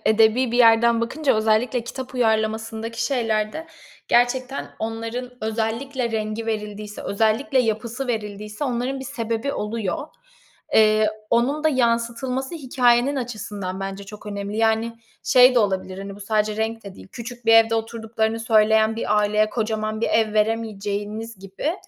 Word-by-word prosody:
edebî 225 +3 +4
bir 240 - +1
yerden 230 0 +5
bakınca 275 +5 0
özellikle 220 +2 +1
kitap 260 +2 -7
uyarlamasındaki 225 0 -1
şeylerde 230 +3 -1 0.4
gerçekten 255 +3 +1
onların 230 +3 -4
özellikle 230 +3 -2
rengi 220 0 -3
verildiyse, 210 -1 -4
özellikle 225 +8 +1
yapısı 235 +2 -1
verildiyse 210 +1 -4
onların 255 +1 -2
bir 265 - -6
sebebi 235 0 -3
oluyor. 220 +6 -3 0.7
Eee, 215 0 +5 0.2
onun 270 +6 +1
da 315 - +6
yansıtılması 250 +2 0
hikâyenin 255 -1 +2
açısından 205 -6 -5
bence 195 +1 -5
çok 210 +1 -11
önemli. 200 0 -4
Yani, 225 +1 +1 0.3
şey 250 0 +6
de - - +5
olabilir, 190 -3 -1
hani, 195 0 -7
bu - - -14
sadece 210 +1 0
renk 225 0 -2
de 200 -1 -9
değil, - - -14
küçük 240 0 -8
bir 225 - +6
evde 225 0 +6
oturduklarını 225 0 -2
söyleyen 220 0 +3
bir 210 -2 +1
aileye 210 +1 +2
kocaman 215 -1 -2
bir - - +1
ev 220 -1 +2
veremeyeceğiniz 215 0 -2
gibi, 195 - -3
225 Hz, 140 wpm, -23 LUFS, 215-245 Hz, 0.7 s, da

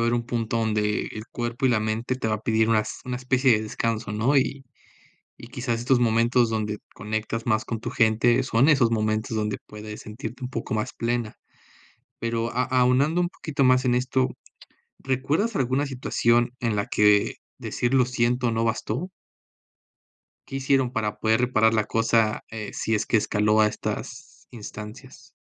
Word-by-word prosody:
haber 115 0 +2
un 120 -1 -2
punto 115 -2 -1
donde 105 -2 0
el 110 0 -7
cuerpo 120 +2 -3
y - - +4
la 115 -3 +2
mente 110 +4 -1
te 110 - -2
va 110 - +1
a 105 - -5
pedir 110 0 +2
unas 110 -1 0
una 125 -1 -3
especie 130 +1 +2
de 110 -1 +2
descanso, 110 0 -2
¿no?, 115 +7 +2
y 135 0 0 0.7
y 115 - -11
quizás 120 -1 -3
estos 125 +1 +2
momentos 115 +1 +3
donde 105 -1 -2 0.2
conectas 110 +2 -3
más 110 -2 0
con 115 - -3
tu 110 - -5
gente, 115 +1 +3
son 130 +7 +3
esos 135 -6 +4
momentos 110 0 -1
donde 105 -1 -1
puedes 105 0 -9
sentirte 110 +3 -8
un 125 - -3
poco 120 -3 -5
más 110 +3 -2
plena, 120 -2 -2 0.8
pero 115 0 -2
a 125 - 0
aunando 130 +6 +2
un 175 - 0
poquito 150 -5 -2
más 130 0 +4
en 125 - +3
esto, 130 +1 +1 0.7
¿recuerdas 140 - -1
alguna 135 +2 +1
situación 120 -3 +1
en 115 -3 0
la 105 0 -1
que 105 -1 +3 0.2
decir 120 +2 -2
lo 130 -1 +5
siento 120 0 0
no 115 0 0
bastó? 120 - -2 1.4
¿Qué 135 - -6
hicieron, 135 -2 +2
para 105 -2 -2
poder 110 +1 +2
reparar 110 -3 +3
la 110 -1 +2
cosa? 115 0 +1
Eh, 110 -2 -6
si 115 - -1
es 105 - 0
que - - +2
escaló, 105 0 +2
a - - +5
estas 105 - -6
instancias. 110 +3 -10
115 Hz, 175 wpm, -25 LUFS, 110-125 Hz, 1.4 s, lo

